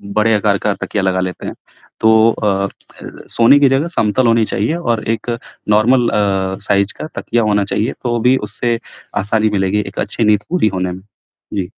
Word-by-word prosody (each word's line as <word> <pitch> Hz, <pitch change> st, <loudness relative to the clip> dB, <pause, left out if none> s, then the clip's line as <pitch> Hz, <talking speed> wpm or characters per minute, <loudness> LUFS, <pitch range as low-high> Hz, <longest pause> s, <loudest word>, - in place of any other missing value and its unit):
बड़े 110 Hz, +1 st, +3 dB
आकार 105 Hz, -1 st, +1 dB
का 105 Hz, -, +1 dB
तकिया 105 Hz, -, -2 dB
लगा 95 Hz, -1 st, +1 dB
लेते 90 Hz, -1 st, -5 dB
हैं। -, -, -5 dB, 0.5 s
तो 110 Hz, +1 st, +5 dB
अ 105 Hz, -, -3 dB, 0.2 s
अ, -, -, -11 dB, 0.6 s
सोने 120 Hz, +5 st, +5 dB
की 140 Hz, -, +5 dB
जगह 135 Hz, +5 st, +1 dB
समतल 110 Hz, +3 st, +2 dB
होनी 115 Hz, -1 st, +3 dB
चाहिए 110 Hz, +12 st, -1 dB
और 120 Hz, -10 st, -1 dB
एक 110 Hz, -, -10 dB, 0.4 s
नॉर्मल 120 Hz, +4 st, +3 dB
अ, 95 Hz, -2 st, 0 dB
साइज़ 100 Hz, 0 st, +2 dB
का -, -, -5 dB
तकिया 115 Hz, -1 st, 0 dB
होना 105 Hz, -1 st, +2 dB
चाहिए 105 Hz, +5 st, -1 dB
तो 120 Hz, -1 st, 0 dB
भी 125 Hz, +2 st, +4 dB
उससे 120 Hz, +2 st, -1 dB, 0.4 s
आसानी 110 Hz, +1 st, +1 dB
मिलेगी 95 Hz, 0 st, 0 dB
एक -, -, -7 dB
अच्छी 115 Hz, -, -2 dB
नींद 105 Hz, -1 st, +3 dB
पूरी 175 Hz, -10 st, +2 dB
होने 90 Hz, -1 st, -1 dB
में। 95 Hz, -, -9 dB, 0.5 s
जी। 100 Hz, -, -1 dB
110 Hz, 190 wpm, -16 LUFS, 100-120 Hz, 0.6 s, तो